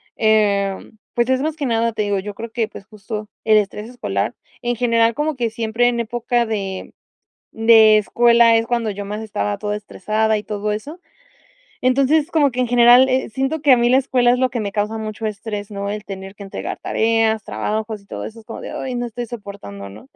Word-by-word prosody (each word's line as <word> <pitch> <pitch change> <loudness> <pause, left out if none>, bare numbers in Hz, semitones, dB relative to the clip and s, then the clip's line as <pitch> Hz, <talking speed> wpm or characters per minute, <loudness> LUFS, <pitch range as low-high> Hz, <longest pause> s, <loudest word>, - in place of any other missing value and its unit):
em 205 -2 +1 0.2
pues, 240 +1 +1
es 260 0 +2
más 310 +1 -1
que 290 - -2
nada, 230 -1 +1
te 215 - -1
digo, 205 -1 0
yo 205 +2 -6
creo 230 +2 -6
que, 225 -1 -1
pues, 200 - -11
justo 215 0 -7 0.2
el 215 -1 +5
estrés 210 +1 -2
escolar. 245 0 -3 0.3
En 240 0 -1
general, 230 -1 +3
como 300 0 -1
que 240 -3 -1
siempre 225 +2 0
en 240 -1 0
época 240 +1 0
de 195 -4 -4 0.6
de 225 -1 +6
escuela, 235 +2 +4
es 225 - 0
cuando 235 -3 0
yo 200 0 -6
más 210 +1 -4
estaba 105 - -2
toda 210 0 -3
estresada 215 +1 -1
y 210 - -5
todo 210 0 -3
eso. 285 +11 -5 0.8
Entonces, 275 +5 +2
como 295 -3 +3
que 250 - -5
en 250 - +1
general, 245 +2 +6
eh, 260 +1 0
siento 270 +7 -2
que 290 -2 +4
a - - +5
mí, 240 0 +2
la 255 - +5
escuela, 250 -2 +3
es 250 - +1
lo 255 0 +2
que 240 - -3
me 200 -1 -3
causa 210 +2 -1
mucho 220 0 -4
estrés, 210 -1 -5
¿no? 200 0 -4
El 210 0 -5
tener 195 0 -8
que 205 - -14
entregar 195 - -6
tareas, 225 -1 +1
trabajos 215 0 -3
y 200 - -25
todo - - -6
eso, 225 +1 -9
es - - -26
como 225 - -8
de: - - -7
"Ay 255 -1 -4
no 245 0 -2
estoy 240 +1 -6
soportando", 200 - -8
¿no? 105 +6 -13
225 Hz, 215 wpm, -20 LUFS, 210-245 Hz, 0.8 s, de